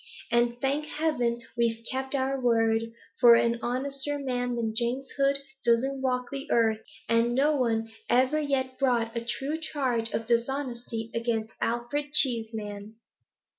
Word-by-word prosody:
And, 240 0 +2
thank 280 +3 0
heaven, 245 -7 -1
we've 230 -1 0
kept 265 +1 -2
our 270 0 0
word; 225 -1 +2 0.3
for 240 -2 +9
an 235 0 +2
honester 275 +3 -2
man 245 -3 -2
than 225 -2 -1
James 245 +3 -1
Hood 275 0 +2 0.3
doesn't 260 +3 +2
walk 250 -1 -1
the 275 0 -5
earth, 220 -2 +3 0.3
and 230 +1 +2
no 295 +3 +3
one 225 -4 +1 0.2
ever 260 +5 +3
yet 260 -3 -1
brought 240 -4 +1
a 235 - -2
true 280 +6 -2
charge 255 -8 -1
of 225 - -3
dishonesty 235 -1 -2
against 230 -1 -1
Alfred 265 +5 -2
Cheeseman.' 220 -4 0
240 Hz, 140 wpm, -28 LUFS, 230-270 Hz, 0.3 s, for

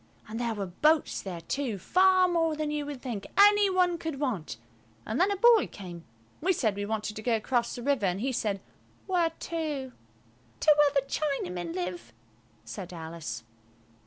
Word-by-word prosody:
And 220 +2 -5
there 235 -2 -1
were 200 -2 -3
boats 305 - +2
there 180 -4 -6
too, 240 +4 -2
far 370 - +4
more 330 -3 +1
than 305 -1 -2
you 295 -1 -2
would 285 -3 -7
think 230 -7 -4
any 410 0 +7
one 360 -2 +2
could 320 -5 -4
want; 225 - -2 0.5
an 220 - -2
then 370 - +4
a 405 - 0
boy 460 +2 +5
came. 175 -4 -10 0.4
We 370 +4 +3
said 220 - 0
we 205 0 -3
wanted 215 -1 -3
to - - -5
go 235 +1 +1
across 235 +2 0
the 240 - -7
river 275 -7 +1
and 180 +1 -1
he 260 +5 -1
said, 205 -5 -1 0.4
"Where 355 -3 +2
to?" 310 -5 -4 0.7
"To 305 -1 +6
where 295 -1 +4
the 275 - +3
Chinamen 180 - -2
live," 180 -9 -5 0.5
said 175 +11 -7
Alice. 160 -9 -6
260 Hz, 180 wpm, -28 LUFS, 195-320 Hz, 0.7 s, any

